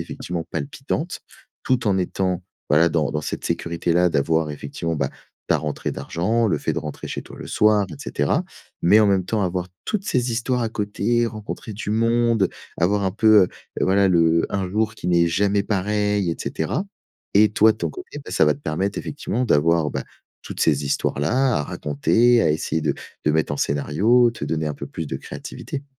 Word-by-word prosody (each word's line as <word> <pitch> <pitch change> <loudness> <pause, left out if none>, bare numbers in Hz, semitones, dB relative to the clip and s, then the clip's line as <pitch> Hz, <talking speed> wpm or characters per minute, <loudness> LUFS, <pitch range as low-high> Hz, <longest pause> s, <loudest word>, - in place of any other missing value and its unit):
effectivement 85 -2 -5
palpitante 145 +4 -3 0.4
tout 125 -3 0
en 95 -1 +2
étant, 95 0 -1 0.3
voilà, 80 +3 +5
dans 75 -3 0
dans 75 - -2
cette - - -5
sécurité-là 85 +1 +1
d'avoir 80 0 +1
effectivement, 75 +3 -4
bah, 70 -2 -1 0.4
ta - - +3
rentrée 75 -2 -3
d'argent, 110 +7 0
le 90 - +1
fait - - -1
de - - -2
rentrer 75 - -7
chez - - -4
toi - - -13
le - - -8
soir, 105 -2 +3
et - - -7
cetera. 70 -1 0 0.4
Mais 100 +5 +6
en 105 - +5
même 95 -2 +2
temps, 105 +1 -1
avoir 90 0 -2 0.2
toutes 205 -3 -2
ces 125 -8 0
histoires 125 +2 0
à 115 - 0
côté, 110 +2 0
rencontrer 110 0 -6
du 105 0 -5
monde, 115 -2 +2 0.3
avoir 100 +4 +2
un 95 - 0
peu, 110 -1 +6
heu, - - -5 0.3
voilà 100 +1 +3
le 85 -2 +3
un 95 -2 -1
jour 110 +3 0
qui 90 - -7
n'est 85 -1 +4
jamais 100 +4 +2
pareil, 105 -2 0
et - - -7
cetera. 130 - -2 0.5
Et 105 +1 +5
toi 110 0 +5
ton 110 - -3
côté, 370 - -9
bah, - - -8
ça - - +4
va - - +3
te - - -15
permettre 95 - -2
effectivement 125 -4 -3
d'avoir, 80 -4 +3
bah, 65 - -3 0.4
toutes - - -8
ces 75 -2 +2
histoires 70 0 -1
là 125 - +2
à 75 - -1
raconter, 115 +14 +2
à 80 - +3
essayer 80 +1 -1
de - - +1 0.3
de 75 - +3
mettre 80 -1 +1
en 70 - -2
scénario, 100 - +3
te 110 - -6
donner 80 -1 -1
un 75 - -2
peu - - -7
plus 80 - -5
de 70 - -5
créativité. 135 - -7
95 Hz, 195 wpm, -22 LUFS, 80-110 Hz, 0.5 s, Mais